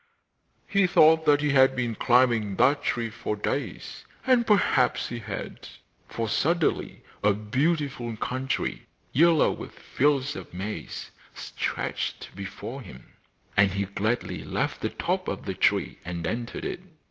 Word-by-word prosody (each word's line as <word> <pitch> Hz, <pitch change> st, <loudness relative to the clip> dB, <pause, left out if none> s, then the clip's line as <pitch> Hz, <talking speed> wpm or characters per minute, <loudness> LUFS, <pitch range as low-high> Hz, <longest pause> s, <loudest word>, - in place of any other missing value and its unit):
He 195 Hz, -2 st, +3 dB
thought 160 Hz, -3 st, +5 dB
that 145 Hz, -1 st, +5 dB
he 150 Hz, -1 st, +1 dB
had 135 Hz, -1 st, +5 dB
been 120 Hz, -2 st, -1 dB
climbing 120 Hz, -3 st, +3 dB
that 140 Hz, +6 st, +3 dB
tree 115 Hz, -5 st, -1 dB
for 105 Hz, -1 st, -3 dB
days, 120 Hz, +7 st, -4 dB, 0.2 s
and 250 Hz, -3 st, +3 dB
perhaps 200 Hz, -11 st, +3 dB
he 120 Hz, -, -5 dB
had, 110 Hz, -, -7 dB, 0.4 s
for 115 Hz, -1 st, -3 dB
suddenly 165 Hz, +9 st, 0 dB, 0.2 s
a 105 Hz, 0 st, +5 dB
beautiful 130 Hz, +1 st, -1 dB
country, 130 Hz, +4 st, -2 dB, 0.3 s
yellow 165 Hz, +2 st, +5 dB
with -, -, -8 dB
fields 145 Hz, +1 st, +1 dB
of -, -, -9 dB
maize, 105 Hz, +3 st, -5 dB, 0.2 s
stretched -, -, -4 dB
before 100 Hz, +7 st, -7 dB
him, 75 Hz, -, -13 dB, 0.4 s
and 100 Hz, -1 st, +4 dB
he 100 Hz, 0 st, -1 dB
gladly 110 Hz, +5 st, -2 dB
left -, -, -2 dB
the -, -, 0 dB
top -, -, -2 dB
of -, -, -4 dB
the -, -, -2 dB
tree -, -, +1 dB
and 85 Hz, -1 st, -5 dB
entered 115 Hz, +6 st, -4 dB
it. -, -, -3 dB
125 Hz, 140 wpm, -26 LUFS, 105-150 Hz, 0.4 s, thought